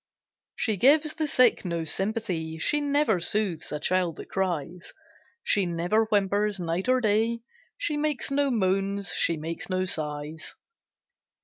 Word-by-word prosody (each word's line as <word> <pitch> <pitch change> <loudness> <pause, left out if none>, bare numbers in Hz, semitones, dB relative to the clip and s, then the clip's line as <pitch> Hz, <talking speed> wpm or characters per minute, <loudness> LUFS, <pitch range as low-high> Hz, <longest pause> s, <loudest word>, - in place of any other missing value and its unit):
She 220 -3 -1
gives 300 - +4
the 315 -2 -2
sick 255 -4 +3
no 170 -3 -2
sympathy, 180 -3 -2
She 295 - +1
never 285 -8 +2
soothes 185 -3 0
a 150 - -3
child 175 0 0
that - - -11
cries; 180 -2 -3 0.5
She 200 -3 +2
never 175 +6 +1
whimpers, 205 -1 +1
night 175 +5 -2
or 255 0 +4
day, 225 +2 +1 0.4
She 335 -12 -1
makes 295 -2 -1
no 280 0 +2
moans, 195 -3 0
she 165 - +2
makes 165 +4 -5
no 185 0 0
sighs. 155 -1 -3
195 Hz, 140 wpm, -26 LUFS, 170-230 Hz, 0.5 s, gives